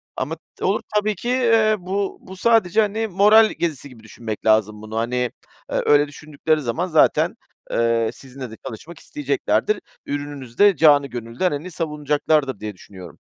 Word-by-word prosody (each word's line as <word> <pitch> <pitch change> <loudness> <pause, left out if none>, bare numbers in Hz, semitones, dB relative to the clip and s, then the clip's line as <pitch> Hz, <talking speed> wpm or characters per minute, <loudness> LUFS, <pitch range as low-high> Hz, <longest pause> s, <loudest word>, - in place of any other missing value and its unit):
ama 150 +5 -3 0.2
t - - -5
olur 200 +3 +1
tabii 210 0 +1
ki, 240 - -5
eee, 230 -4 +3
bu 195 +2 -3
bu 190 0 -11
sadece, 220 -2 +3
hani, 220 +1 -1
moral 210 +3 +5
gezisi 155 -4 -2
gibi 115 -4 -16
düşünmek 110 -1 -7
lazım 110 -1 +2
bunu. 110 +1 -6
Hani, 125 +1 -1 0.4
öyle 145 0 +3
düşündükleri 150 +1 -2
zaman 145 +9 -2
zaten, 160 -3 +3 0.4
eee, 115 -1 +1
sizinle 130 -2 -10
de 110 - -10
çalışmak 160 +10 -9
isteyeceklerdir. 390 +7 -1 0.3
Ürününüzü 145 -4 -6
de 205 -2 +6
canı 145 -2 +5
gönülden, 120 +9 -2
hani, 155 +5 -5
savunacaklardır 150 - 0
diye 105 -1 -5
düşünüyorum. 90 -2 -13
150 Hz, 155 wpm, -21 LUFS, 120-195 Hz, 0.4 s, de